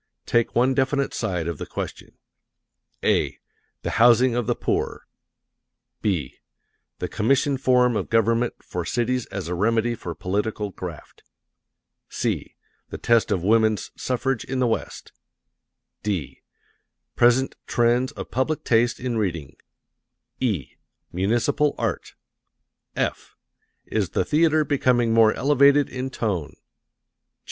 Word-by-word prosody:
Take 120 Hz, -1 st, +1 dB
one 125 Hz, +3 st, +3 dB
definite 140 Hz, +1 st, 0 dB
side 90 Hz, -7 st, -2 dB
of 85 Hz, -4 st, -4 dB
the -, -, -5 dB
question, -, -, -7 dB, 0.9 s
(a) -, -, +1 dB, 0.5 s
"The -, -, -2 dB
Housing 120 Hz, +1 st, +6 dB
of 120 Hz, -2 st, -1 dB
the 120 Hz, -, +1 dB
Poor;" -, -, -2 dB, 1.0 s
(b) 80 Hz, -10 st, -2 dB, 0.6 s
"The -, -, -3 dB
Commission 135 Hz, +6 st, +1 dB
Form 125 Hz, -2 st, +3 dB
of 100 Hz, -, -2 dB
Government 115 Hz, +1 st, +2 dB
for 90 Hz, -, -4 dB
Cities 125 Hz, +4 st, -1 dB
as 95 Hz, -3 st, -5 dB
a 90 Hz, -, -2 dB
Remedy 115 Hz, +5 st, +1 dB
for 90 Hz, -7 st, -6 dB
Political 105 Hz, +4 st, -2 dB
Graft;" 85 Hz, -4 st, -9 dB, 0.9 s
(c) -, -, -3 dB, 0.3 s
"The -, -, -6 dB
Test 115 Hz, -1 st, +2 dB
of 90 Hz, -, 0 dB
Woman's 110 Hz, +1 st, +2 dB
Suffrage 130 Hz, -1 st, -1 dB
in 135 Hz, -, -4 dB
the 130 Hz, -, +2 dB
West;" 115 Hz, -, -3 dB, 0.9 s
(d) 85 Hz, -11 st, -3 dB, 0.7 s
"Present 120 Hz, +2 st, +3 dB
Trends 120 Hz, +2 st, +2 dB
of -, -, -8 dB
Public 135 Hz, +4 st, -1 dB
Taste 115 Hz, +1 st, +2 dB
in 120 Hz, -2 st, -2 dB
Reading;" 85 Hz, -9 st, -3 dB, 0.8 s
(e) 100 Hz, -, -2 dB, 0.3 s
"Municipal 120 Hz, +10 st, +1 dB
Art;" -, -, -3 dB, 0.8 s
(f) -, -, -3 dB, 0.5 s
"Is 105 Hz, -5 st, -1 dB
the -, -, 0 dB
Theatre 155 Hz, 0 st, +3 dB
Becoming 125 Hz, -5 st, +2 dB
more 115 Hz, -1 st, +6 dB
Elevated 140 Hz, +1 st, +4 dB
in 130 Hz, +1 st, -4 dB
Tone?" 100 Hz, -, -3 dB
115 Hz, 120 wpm, -24 LUFS, 100-130 Hz, 1.0 s, Housing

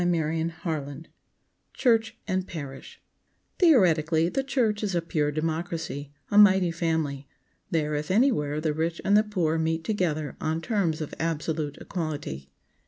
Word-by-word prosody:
CHAPTER 165 Hz, -1 st, 0 dB, 0.2 s
XXXIII 150 Hz, -2 st, -4 dB, 0.6 s
CHURCH 225 Hz, -3 st, +2 dB
AND 185 Hz, -2 st, -1 dB
PARISH 140 Hz, -5 st, -8 dB, 0.6 s
THEORETICALLY, 170 Hz, -, +4 dB
the 270 Hz, +7 st, -1 dB
church 245 Hz, -6 st, 0 dB
is 200 Hz, -4 st, -1 dB
a 170 Hz, -, +2 dB
pure 150 Hz, -3 st, 0 dB
democracy, 160 Hz, -2 st, -3 dB, 0.2 s
a 205 Hz, -, +6 dB
mighty 190 Hz, -4 st, +6 dB
family. 160 Hz, -5 st, -1 dB, 0.4 s
There, 150 Hz, -2 st, 0 dB
if 150 Hz, 0 st, -2 dB
anywhere, 185 Hz, -, +2 dB
the 155 Hz, -1 st, 0 dB
rich 165 Hz, +2 st, -2 dB
and 200 Hz, -, +4 dB
the 210 Hz, -, +7 dB
poor 175 Hz, -7 st, 0 dB
meet 160 Hz, 0 st, 0 dB
together 160 Hz, -8 st, -1 dB
on 160 Hz, +1 st, -1 dB
terms 170 Hz, -6 st, 0 dB
of 155 Hz, -, -5 dB
absolute 155 Hz, -2 st, -2 dB
equality. 145 Hz, -, -5 dB
165 Hz, 140 wpm, -26 LUFS, 155-185 Hz, 0.6 s, the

